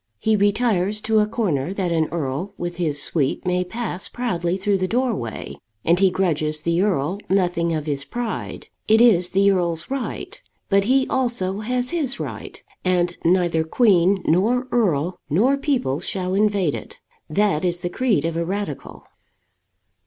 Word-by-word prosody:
He 220 - +1
retires 205 -1 +2
to 220 0 +2
a 210 - +2
corner 190 - -1
that 185 -3 -1
an 160 -2 +1
earl 170 +5 -3
with 175 0 -5
his 155 -5 0
suite 140 +1 0
may 180 0 +1
pass 190 -1 -5
proudly 180 -7 -2
through 195 0 0
the 185 - 0
doorway, 205 - -2 0.3
and 170 +2 +4
he 195 -1 +5
grudges 155 -5 0
the 170 +2 +1
earl 185 -2 0
nothing 175 -3 +1
of 155 -2 -2
his 140 -2 -2
pride. 240 +3 -5 0.2
It 220 +1 +5
is 190 -7 +5
the 200 +1 +3
earl's 170 0 -1
right. 275 - -5 0.3
But 195 0 +3
he 265 +3 +3
also 235 -7 0
has 250 +3 -2
his 285 -6 -1
right; - - -7 0.2
and 175 -1 +1
neither 170 -2 +2
queen, 190 0 +3
nor 230 +10 +2
earl, 175 -6 +1
nor 230 - +3
people 260 - -1
shall 185 -1 -3
invade 200 -6 +2
it. - - -8 0.3
That 190 -1 +1
is 175 -1 0
the 175 - -2
creed 245 -5 +1
of 165 0 -2
a 170 - 0
radical. 200 +4 -5
185 Hz, 160 wpm, -22 LUFS, 170-215 Hz, 0.3 s, he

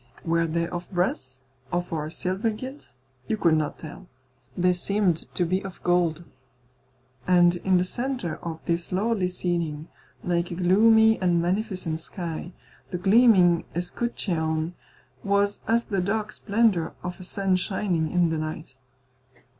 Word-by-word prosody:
Were 165 0 +2
they 170 +1 -1
of 175 0 -6
brass 130 -8 -2 0.3
or 170 -3 -2
of 155 - -7
silver 190 +5 -1
gilt? 255 - -8 0.3
You 220 - 0
could 170 -5 +3
not 155 -2 -1
tell. 175 +4 -10 0.5
They 180 0 +3
seemed 180 -1 0
to 180 - +1
be 185 +4 0
of 195 -2 -8
gold. 175 -2 +1 1.0
And 175 -1 +5
in 185 +1 +2
the 180 - +3
centre 240 -2 -3
of 165 -1 -6
this 170 +1 -1
lordly 195 0 +1
ceiling, 170 -4 -3 0.3
like 175 0 0
a 175 - -5
gloomy 220 +5 +5
and 175 -2 +3
magnificent 185 -2 -1
sky, 170 0 -6 0.4
the 180 - -3
gleaming 190 -3 +5
escutcheon 170 -4 -2 0.5
was 200 0 +1
as 230 +1 +3
the 195 -3 -1
dark 215 +3 -1
splendour 205 -6 +1
of 180 0 -5
a - - -8
sun 195 0 0
shining 185 -4 0
in 175 -2 +3
the 160 -1 -1
night. 155 -3 -6
180 Hz, 145 wpm, -25 LUFS, 170-200 Hz, 1.0 s, And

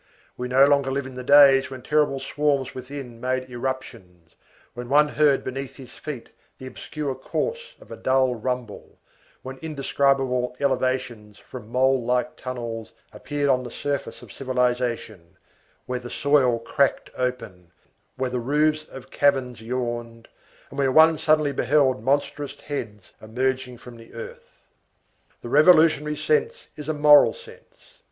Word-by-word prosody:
We 125 - -4
no 130 +2 +5
longer 140 -1 +2
live 135 0 -2
in 130 - -9
the 125 0 -7
days 140 -1 +6
when 130 -2 -9
terrible 150 -1 +1
swarms 140 -2 -1
within 130 -2 -9
made 130 0 -2
irruptions, 120 -9 -6 0.4
when 120 0 -8
one 150 +2 +4
heard 145 -2 +2
beneath 135 +1 -6
his 130 -3 -12
feet 145 -6 -8 0.3
the 130 - -10
obscure 140 +2 -5
course 470 - -4
of - - -17
a - - -6
dull 130 -1 +1
rumble, 125 -1 -5 0.5
when 130 +1 -8
indescribable 135 -4 0
elevations 130 -6 -2
from 120 -5 -11
mole 130 +1 +2
like 125 +6 -1
tunnels 120 -5 -6 0.2
appeared 145 +7 -3
on 130 -1 +3
the 120 - -7
surface 140 +3 -4
of - - -13
civilization, 125 -8 -2 0.5
where 125 0 -3
the 120 0 -9
soil 140 -5 +2
cracked 140 +4 0
open, 115 -9 -4 0.5
where 130 -1 -2
the 125 - -2
roofs 150 +4 +1
of 135 -4 -12
caverns 130 -5 +1
yawned, 120 -1 -5 0.4
and 140 - -7
where 135 -1 +2
one 160 +2 +6
suddenly 155 -2 +2
beheld 135 -4 +1
monstrous 145 +1 -1
heads 110 -9 -7
emerging 125 +2 -2
from 120 0 -13
the 115 0 -15
earth. 115 - -11 0.8
The 120 - -6
revolutionary 155 0 +5
sense 460 +1 -1
is 150 0 -8
a - - +1
moral 150 -1 +6
sense. 475 +1 -17
130 Hz, 145 wpm, -24 LUFS, 125-145 Hz, 0.8 s, days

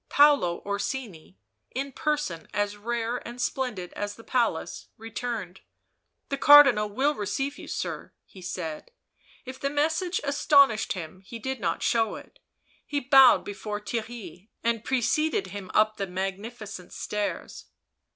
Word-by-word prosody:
Paolo 285 -12 +4
Orsini, 200 -3 -4 0.4
in 275 +2 -2
person 295 - -2
as 205 0 0
rare 235 +2 -2
and 240 0 -9
splendid 245 -8 -2
as 205 0 -4
the 230 - -14
palace, 240 -2 -1
returned. 225 -4 -5 0.3
" - - -51
The 275 - -2
Cardinal 275 -9 +8
will 270 +8 +1
receive 270 +5 -3
you, - - -9
sir," - - -4
he 190 - -14
said; 175 - -5 0.6
if 260 0 -8
the 275 - -1
message 320 +5 0
astonished 280 -5 +4
him 185 0 -8
he 230 +5 -8
did 265 +3 -4
not 170 -4 -1
show 225 -3 +2
it; - - -13 0.4
he 290 - -2
bowed 270 -1 +6
before 205 +1 -5
Theirry, 215 -4 -6
and 230 -1 0
pre 265 -2 0
cceded 305 - +1
him 200 -2 -7
up 215 0 +3
the 195 - -2
magnificent 195 +2 -5
stairs. 210 -1 -4
225 Hz, 140 wpm, -27 LUFS, 200-270 Hz, 0.6 s, Cardinal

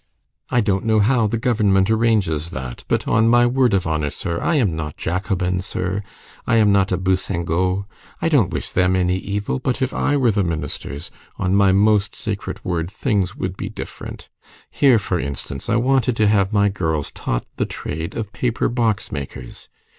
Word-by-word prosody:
I 120 - +3
don't 100 -2 0
know 110 -1 +3
how 115 +1 +3
the 115 - -1
government 105 -4 +2
arranges 105 -9 +1
that, 65 -5 -6
but, - - 0
on 115 0 +3
my 120 0 +5
word 125 -3 +3
of 95 - 0
honor, 80 -2 0
sir, 85 +3 -4
I 170 - +1
am 105 - +2
not 75 -2 -5
Jacobin, 90 0 -1
sir, 95 +1 -3 0.5
I 115 - +3
am 105 -2 +5
not 100 0 +3
a 90 - +2
bousingot.30 95 0 0 0.3
I - - 0
don't 140 - +3
wish - - -4
them 90 0 +2
any 90 0 +1
evil, 100 +5 -3
but 130 0 -1
if 130 -1 -1
I 145 - +1
were 125 -4 +3
the 100 -1 +1
ministers, 80 -2 -4 0.3
on 95 -1 0
my 100 -1 +5
most 100 +1 +3
sacred - - -5
word, 85 -1 -1
things 100 -4 -1
would 95 0 -3
be - - -5
different. - - -8 0.4
Here, 135 -5 +5
for 95 -4 -1
instance, 70 - -5
I 115 - +3
wanted 125 0 +2
to 110 -2 +3
have 100 -2 +3
my 100 -1 +3
girls 80 -7 -2
taught - - -3
the - - 0
trade 80 +2 -5
of 105 -3 -4
paper 120 -1 0
box 115 -4 0
makers. 65 -4 -7
100 Hz, 185 wpm, -21 LUFS, 90-115 Hz, 0.5 s, my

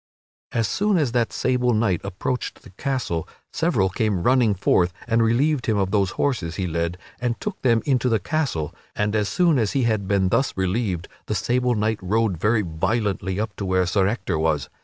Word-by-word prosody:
As 115 -2 0
soon 205 -1 +1
as 145 -7 +1
that 120 -1 +1
sable 125 -2 +1
knight 105 -5 +1
approached 100 +6 -4
the 100 - -14
castle, 105 - -2 0.3
several 160 - +2
came 95 -1 -1
running 120 -4 +3
forth 90 -1 +2 0.2
and 115 0 +2
relieved 125 +5 +2
him 110 -2 +2
of 95 -1 0
those 100 -2 +2
horses 105 - -1
he 95 - -2
led 85 +1 -2 0.2
and 120 -1 -2
took 210 -2 -5
them 115 -3 +3
into 130 -4 +2
the 115 - +3
castle, 115 - -2 0.2
and 105 +1 0
as 105 -2 +1
soon 165 - +3
as 110 -4 0
he 135 - +1
had 110 -4 0
been 95 -2 +2
thus 130 +3 +1
relieved 95 -2 -1 0.2
the 105 - -1
sable 125 +4 +1
knight 110 0 0
rode 105 +1 +1
very 105 +3 +2
violently 95 +3 -1
up 110 -1 -3
to - - -4
where 95 0 +2
Sir 95 +1 +2
Ector 100 -7 -1
was. 80 -4 0
110 Hz, 195 wpm, -23 LUFS, 95-125 Hz, 0.3 s, running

